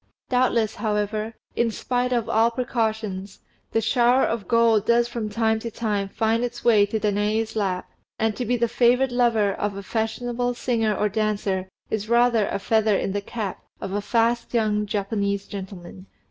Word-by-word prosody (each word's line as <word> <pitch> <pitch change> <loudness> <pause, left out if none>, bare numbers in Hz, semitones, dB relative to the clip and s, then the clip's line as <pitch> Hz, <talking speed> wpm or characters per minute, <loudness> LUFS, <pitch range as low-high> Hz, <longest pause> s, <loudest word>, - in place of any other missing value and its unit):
Doubtless, 245 -4 +2
however, 210 +1 -2 0.2
in 235 -1 +2
spite 250 +3 -1
of 240 -3 0
all 225 +1 +3
precautions, 220 -5 -2 0.3
the 225 - +1
shower 240 +3 +3
of 220 -5 -1
gold 230 -3 +3
does 235 0 +4
from 235 -3 -4
time 220 +1 +1
to 230 - -5
time 205 -3 -2
find 225 +3 0
its 240 0 -5
way 215 -4 +5
to 220 +2 -2
Danaë's 215 +2 0
lap; 190 -4 -1 0.3
and 220 -1 0
to 250 - -3
be 245 +1 0
the 235 0 +2
favoured 245 +2 +3
lover 230 -5 +2
of 200 0 -3
a 200 - -6
fashionable 240 +3 -2
singer 225 -4 0
or 210 - +1
dancer 205 -3 -1 0.2
is 220 0 -2
rather 235 -2 +4
a - - -2
feather 215 0 +2
in - - -2
the 200 +1 -2
cap 205 -2 -5 0.2
of - - -5
a 205 - 0
fast 235 +3 0
young 210 -2 +1
Japanese 200 -1 -1
gentleman. 190 -1 -9
220 Hz, 175 wpm, -24 LUFS, 205-235 Hz, 0.3 s, way